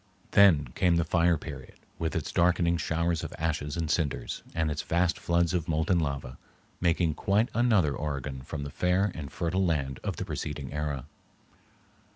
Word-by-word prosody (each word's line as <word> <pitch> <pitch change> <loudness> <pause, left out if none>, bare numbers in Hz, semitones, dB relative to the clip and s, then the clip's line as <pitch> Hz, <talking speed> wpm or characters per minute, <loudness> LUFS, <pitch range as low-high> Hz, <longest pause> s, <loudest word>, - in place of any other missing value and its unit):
Then 80 -10 +6
came 90 -1 +3
the 85 -1 +2
fire 85 0 +3
period 70 -4 -9 0.2
with 80 0 -2
its 80 - -2
darkening 85 -1 +3
showers 85 0 0
of - - -6
ashes 75 -1 -2
and 80 -1 -1
cinders 75 -2 -1
and 80 -2 +1
its 75 - -2
vast 85 0 +1
floods 85 0 +1
of 85 -3 -1
molten 80 +3 +2
lava, 70 -5 -3 0.4
making 85 -2 +2
quite 100 +8 +1
another 110 -11 +3
Oregon 70 -3 -4
from 70 +2 -5
the 70 - -6
fair 90 +5 +1
and 75 -4 -7
fertile 90 +3 0
land 70 -6 0
of - - -2
the - - -4
preceding 70 -3 -5
era. 75 -3 -3
80 Hz, 170 wpm, -28 LUFS, 75-85 Hz, 0.4 s, Then